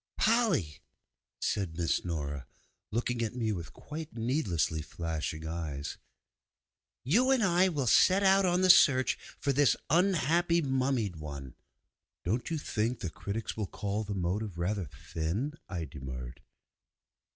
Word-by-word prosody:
'Polly!' 190 - +2 0.6
said 95 -5 -1
Miss 85 -2 0
Nora, 75 -5 -4 0.4
looking 120 +1 -1
at 115 0 -2
me 115 -3 0
with 85 -8 -5
quite 155 - -8
needlessly 105 - 0
flashing 80 0 -4
eyes, 80 -3 -4 1.0
'you 225 - +3
and 265 -4 +4
I 185 0 +4
will 145 -6 -1
set 185 - +5
out 195 0 +5
on 180 0 +2
the 185 - +3
search 130 -6 +5 0.2
for 140 - 0
this 145 0 +4 0.2
unhappy 170 -1 +3
mummied 130 - 0
one.' 70 -4 -7 0.7
'Don't 115 +8 -1
you 165 - -1
think 120 -4 -2
the 90 -5 -3
critics 100 +7 -4
will 105 -3 -2
call 105 +3 -3
the 100 -1 -4
motive 95 +1 -2
rather 95 +2 -1
thin?' 90 - -3 0.2
I 85 -4 -3
demurred. 65 -4 -8
110 Hz, 135 wpm, -30 LUFS, -, 1.0 s, set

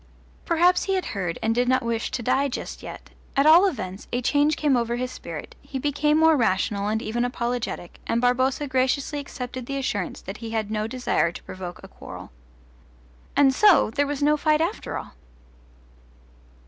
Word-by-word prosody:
Perhaps 350 +2 +3
he 390 - +1
had 375 - -1
heard 180 -5 -2
and 225 +1 +2
did 245 +1 +1
not 255 -1 +2
wish 230 -1 -1
to 245 - -4
die 265 +4 +2
just 255 - -6
yet: - - -10 0.3
at 275 - +4
all 335 +5 +8
events 195 - -5
a 245 - 0
change 290 +5 +2
came 290 -3 +2
over 235 -1 0
his 250 +1 -3
spirit; 165 -10 -8
he 280 -1 -6
became 295 +2 +1
more 320 0 +5
rational 205 -4 +1
and 220 +1 -1
even 240 +3 -1
apologetic, 240 -6 -3
and 230 - +1
Barboza 255 +3 +1
graciously 265 +3 0
accepted 255 -3 -6
the 275 - -3
assurance 205 -8 -2
that 195 +2 -7
he 230 -1 -7
had 220 -2 -2
no 215 0 -1
desire 245 -8 0
to - - -10
provoke 180 -1 -8
a - - -9
quarrel. - - -10 1.0
And 275 -2 +5
so 380 - +5
there 285 +4 +1
was 290 0 -2
no 300 +1 +4
fight 305 0 +2
after 335 +6 -2
all! - - -8
255 Hz, 185 wpm, -24 LUFS, 225-290 Hz, 1.0 s, all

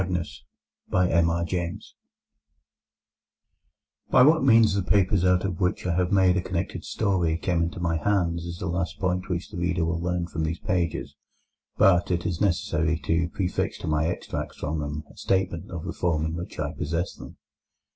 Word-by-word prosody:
COUNT 95 0 -2 0.8
MAGNUS 85 0 0 2.2
By 125 - +6
what 155 +3 +5
means 115 -5 +6
the 100 - +1
papers 95 0 +2
out 90 0 +3
of 90 -3 -3
which 90 +1 0
I 90 - +1
have 90 +1 +1
made 95 -2 +4
a - - +1
connected 90 -1 -3
story 90 -6 0
came 85 -1 0
into 85 +2 -2
my 85 -2 0
hands 85 -3 0
is 85 0 -6
the 95 - -5
last 85 -3 -2
point 90 +2 -1
which 90 +1 -3
the 100 - -7
reader 85 -1 0
will 85 0 -1
learn 90 0 -1
from 80 -1 -4
these 80 +2 -1
pages. 85 -3 -2 0.6
But 95 -4 +4
it 90 -1 -1
is 85 0 -2
necessary 85 -4 +1
to 85 +2 +1
prefix 90 0 -2
to - - -7
my 80 +1 +1
extracts 85 - -4
from 80 +1 -3
them 75 0 -4
a - - -18
statement 95 -4 -1
of 85 -1 -6
the - - -4
form 80 -3 0
in 80 - -2
which 85 +1 -6
I - - -2
possess 85 +4 -2
them. - - -12
85 Hz, 175 wpm, -26 LUFS, 85-95 Hz, 2.2 s, By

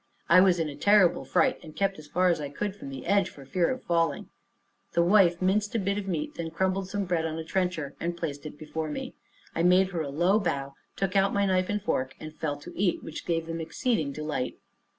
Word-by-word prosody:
I 185 - +7
was 185 -2 +5
in 160 - 0
a 145 - -6
terrible 200 +2 +4
fright, 260 -1 +2
and 155 -1 -12
kept 195 -3 0
as 150 - -12
far 180 +4 +2
as 165 -3 +1
I 145 - -4
could 195 +7 -3
from 140 - -9
the 135 -2 -7
edge, 195 0 +3
for 140 - -13
fear 170 +5 +1
of 260 - -3
falling. 165 -1 0 0.6
The 170 - +4
wife 175 -2 +5
minced 205 +3 +1
a - - +3
bit 200 +1 0
of 200 - -6
meat, 160 -5 -2
then 165 -1 -4
crumbled 190 +3 -1
some 200 0 -2
bread 175 -3 0
on 160 0 -3
a 160 - -4
trencher, 175 -4 -2
and 170 +1 -2
placed 155 -3 -4
it 150 - -10
before 155 +1 -4
me. 150 - -5 0.4
I 165 - -1
made 180 +2 +5
her 170 -3 -2
a 145 - -3
low 175 +9 +3
bow, 140 -8 -2 0.2
took 195 -1 -2
out 195 0 +3
my 200 0 +3
knife 185 -1 +1
and 205 0 0
fork, 130 -9 -1
and 155 0 -8
fell 150 -2 -3
to - - -10
eat, 185 -2 0
which 160 - -7
gave 165 -1 0
them 165 0 -4
exceeding 165 - -1
delight. 150 -3 -3
170 Hz, 240 wpm, -28 LUFS, 155-195 Hz, 0.6 s, I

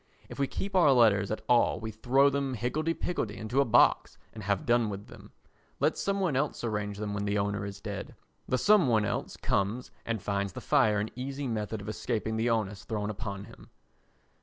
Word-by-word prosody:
If - - -9
we 140 - +2
keep 195 +6 -5
our 170 -6 +6
letters 105 -5 +4
at 110 - -3
all 120 -1 +3
we 110 0 -5
throw 130 +6 +3
them 140 -2 -1
higgledy 150 +9 -1
piggledy 110 -12 -3
into 120 +6 0
a - - +2
box 110 - +4 0.2
and 110 - -8
have 100 -2 -1
done 120 -2 +3
with 100 0 -6
them; - - -13 0.5
let - - +2
some 200 0 -1
one 180 -8 +1
else 140 0 -1
arrange 105 -3 -2
them 105 0 -3
when 100 0 -2
the 100 0 0
owner 100 0 -1
is 100 0 -8
dead. 100 -2 -6 0.3
The 130 - +1
some 205 0 +5
one 110 -3 +3
else - - -3
comes 105 +6 -1
and 115 -1 -2
finds 100 -1 -2
the - - -6
fire 105 -1 +3
an 105 +1 -3
easy 135 +2 -4
method 110 -2 -3
of 100 - -9
escaping 110 +1 -2
the 115 +2 +1
onus 105 -4 -1
thrown 105 -1 -3
upon 100 -2 -5
him. - - -14
110 Hz, 210 wpm, -29 LUFS, 105-130 Hz, 0.5 s, our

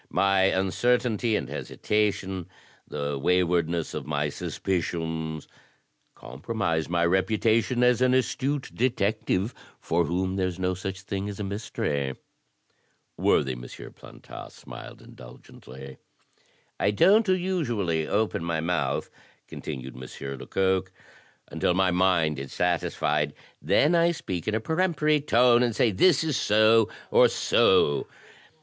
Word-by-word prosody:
My 95 -1 +3
uncertainty 110 +4 +1
and - - -2
hesitation, 95 -4 -2 0.4
the 70 -1 -3
wa3rwardness 85 0 +1
of - - -5
my 75 0 -1
suspicions, 80 -2 -3 0.7
compromise 80 - -3
my 85 -1 +1
reputation 110 +6 +1
as 125 0 +3
an 130 0 +4
astute 135 +2 -1
detective, 110 -3 0 0.3
for 85 +1 0
whom 95 +4 -2
there's 95 -2 -1
no 95 0 -1
such 95 +1 -6
thing 100 +1 -4
as 100 - -7
a - - -2
mystery." 75 - -3 1.0
Worthy 65 - +2
M. - - -6
Plantat - - -11
smiled - - -11
indulgently. 65 +2 -13 0.8
"I - - +2
don't 200 - +4
usually 120 - 0
open 105 -5 0
my 85 -1 -1
mouth," 85 +1 -1 0.4
continued 65 -1 -7
M. 70 +2 -7
Lecoq, 95 -1 0 0.6
"until 90 - 0
my 95 -1 +2
mind 90 -5 +2
is 70 -1 -7
satisfied; 75 -4 0 0.3
then 100 - +3
I 170 0 +4
speak 90 - -5
in 110 - 0
a - - +1
peremptory 155 +1 +1
tone, 120 -3 +4
and 120 -3 +1
say 115 0 +3
this 160 - +4
is 155 -4 -1
so 110 +1 +4 0.2
or - - +6
so. 70 - +2
95 Hz, 120 wpm, -26 LUFS, 80-115 Hz, 1.0 s, or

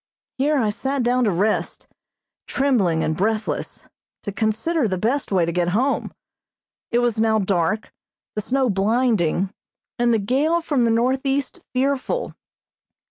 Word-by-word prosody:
Here 295 +2 +2
I 220 -5 +1
sat 265 +4 -2
down 250 +1 +2
to - - +3
rest, 200 +5 -1 0.6
trembling 205 - +1
and 155 - 0
breathless, 215 +5 -2 0.4
to 205 - -4
consider 225 - 0
the 190 -2 -1
best 240 +8 -1
way 180 -3 +3
to 170 - -2
get 175 0 0
home. 270 +4 0 0.8
It 235 - +1
was 240 -2 +1
now 220 -1 +3
dark, 195 +1 0 0.4
the 210 - -2
snow 260 +4 +1
blinding, 200 -3 +1 0.5
and 240 0 +3
the 230 - +4
gale 275 +11 +1
from 290 -7 +1
the - - +2
northeast 265 +4 0
fearful. 275 - -1
230 Hz, 140 wpm, -22 LUFS, 200-265 Hz, 0.8 s, the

